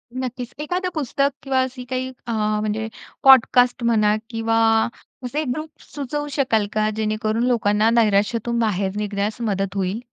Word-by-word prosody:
नक्कीच. 255 -1 -5
एखादं 360 +5 -2
पुस्तक 280 -1 0
किंवा 270 -1 +1
असी 260 0 -4
काही 255 0 -3 0.2
अ, - - -2
म्हणजे 215 0 -1 0.4
पॉडकास्ट 250 -2 +6
म्हणा 215 -3 +3
किंवा 225 -1 0 0.7
असे 290 +5 -2
ग्रुप्स 305 +4 -6
सुचवू 290 +1 -3
शकाल 240 -7 +1
का? 215 0 +1
जे 220 0 -1
णेकरून 215 +1 -1
लोकांना 220 -3 +2
नैराश्यातून 230 +1 +2
बाहेर 200 -4 0
निघण्यास 210 +2 -2
मदत 195 -3 -1
होईल? 195 +2 -1
230 Hz, 140 wpm, -22 LUFS, 215-255 Hz, 0.7 s, पॉडकास्ट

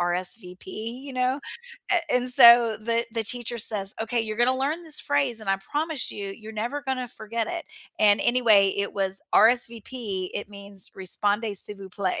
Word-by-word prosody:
RSVP, 180 +2 -3
you 235 +7 -6
know, 255 +2 0 0.5
a 360 - +4 0.2
and 250 0 +1
so 235 -3 +8
the 230 +1 0
the 230 - -1
teacher 240 +1 -1
says, 205 -2 +2
"Okay, 235 +1 -1
you're 215 -1 -4
gonna 250 +3 +2
learn 295 +6 -2
this 310 -2 -2
phrase, 280 -6 0
and 195 - -3
I 195 - +2
promise 295 - -3
you, 200 -1 -6
you're 220 0 -11
never 240 +7 -3
gonna 260 -3 -3
forget 225 0 -4
it." 345 -1 -4 0.3
And, 205 -1 +5
anyway, 220 -6 +4
it 200 0 -2
was, 195 -1 -1
"RSVP." 230 -3 +1
It 205 - -5
means, 200 -2 -7
"répondez 205 +3 -1
s'il 210 - -5
vous 195 -1 -11
plaît." 185 -1 -2
225 Hz, 175 wpm, -25 LUFS, 200-250 Hz, 0.5 s, so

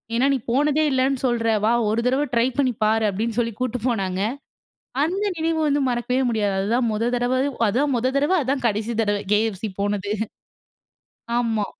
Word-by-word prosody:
ஏன்னா 260 +4 +3
நீ - - +2
போனதே 295 +3 +2
இலலன்னு 265 0 +1
சொல்ற 240 -2 0 0.2
வா 225 - +3 0.2
ஒரு 225 +2 +1
தடவ 265 +3 +2
ட்ரை 235 +1 +3
பண்ணி 260 -3 +2
பார்" 220 +1 +2
அப்டின்னு 220 +4 -3
சொலலி 230 -2 0
கூட்டிட்டு 250 -1 -2
போனாங்க 190 -4 -1 0.8
அந்த 375 +6 -1
நினவு 320 0 0
வந்து 285 0 +1
மறக்கவே 250 +2 0
முடியாது 210 -3 0
அதுதான் 230 +5 +1
முதல 225 +3 0
தடவ 245 +1 0 0.3
அதுதான் 270 +6 +1
முதல 255 +3 0
தடவ 295 +7 +2
அதான் 260 -1 -1
கடைசி 220 +2 -1
தடவ 205 -1 +1 0.2
KFC 215 -2 0 0.2
போனது. 205 0 -1 1.3
ஆமா. 225 -4 0
240 Hz, 165 wpm, -23 LUFS, 215-265 Hz, 1.3 s, ஏன்னா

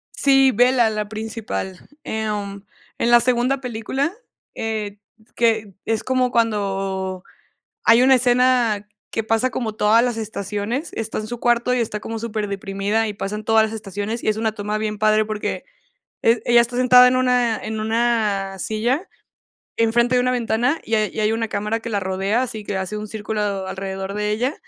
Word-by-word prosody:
Sí, 270 -1 +4
Bella, 245 0 +4
la 210 -1 -3
principal. 220 -4 -5 0.2
Em, 205 -2 -3 0.3
en 235 - +1
la 240 - +8
segunda 250 +2 +1
película, 250 +6 -2 0.4
eh, 210 -2 -4 0.3
s - - -33
que 220 -4 +1
es 225 -1 -1
como 255 -1 +1
cuando 195 -4 -1 0.6
hay 230 +2 +6
una 260 +1 +6
escena 245 -4 +2 0.2
que 225 - -1
pasa 225 +3 +1
como 225 -4 -3
todas 220 +3 +4
las 240 -2 -1
estaciones, 215 - -3
está 225 -1 -4
en 215 - -4
su 240 0 -6
cuarto 240 +1 +2
y 250 - +1
está 215 -2 -2
como 225 +1 -5
superdeprimida, 210 -1 -2
y 210 - -4
pasan 205 +2 -4
todas 225 -1 +4
las 220 - -6
estaciones, 210 +2 -4
y - - -4
es 215 - 0
una 220 -1 0
toma 210 0 -3
bien 215 -1 -3
padre 215 0 +3
porque 215 - -4 0.6
e 230 0 +4
ella 240 0 +5
está 240 +1 -1
sentada 250 0 +7
en 255 - +2
una 250 -3 +2
en 220 0 -4
una 215 -4 0
silla, 240 - -1 0.7
enfrente 235 +2 +2
de - - +4
una 250 - +1
ventana, 245 +5 0
y 225 - -1
hay 215 -1 +1
y 220 - -4
hay 215 +1 +2
una 225 0 -1
cámara 215 +2 -2
que 230 - -6
la 200 -2 0
rodea, 195 +5 0
así 220 -4 -4
que 200 - -3
hace 190 +3 -4
un 210 0 -6
círculo 205 -3 -3
alrededor 190 +1 -5
de 210 0 -1
ella, 245 +7 0
220 Hz, 180 wpm, -21 LUFS, 210-240 Hz, 0.7 s, la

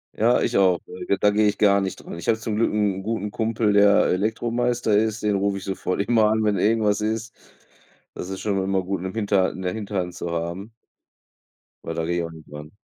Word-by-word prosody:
Ja, 120 +3 +3
ich - - 0
auch. 95 -3 +4
Äh, 90 - -8
ge 100 - +1
da 105 - +3
gehe 105 +1 +3
ich 105 - 0
gar 100 -1 +4
nicht 95 -1 -2
dran. - - -8
Ich - - -8
habe 110 - +3
zum 110 -1 -3
Glück 115 - +2
'n 100 -3 0
guten 105 0 -3
Kumpel, 110 -1 0
der 100 0 +5
Elektromeister 115 +3 0
ist, 110 0 0
den 105 -1 +1
rufe 100 0 0
ich 95 - -8
sofort 95 -1 -2
immer 110 0 +3
an, 110 0 +1
wenn 105 -2 +1
irgendwas 105 +1 +2
ist. 110 +1 -3 0.8
Das - - -6
ist 95 0 -5
schon 100 -2 0
immer 95 0 0
gut, 95 -1 -3
'ne 95 0 -4
hinter 100 -4 +1
'ne 95 -1 -3
Hinterhand 100 -4 -3
zu 85 -1 -5
haben 85 +6 -4 1.1
weil 80 - -5
da 80 0 -2
gehe 85 +1 -1
ich 85 - -1
auch 85 - -5
nicht 80 -2 -14
dran. 75 +1 -9
100 Hz, 225 wpm, -23 LUFS, 95-110 Hz, 1.1 s, der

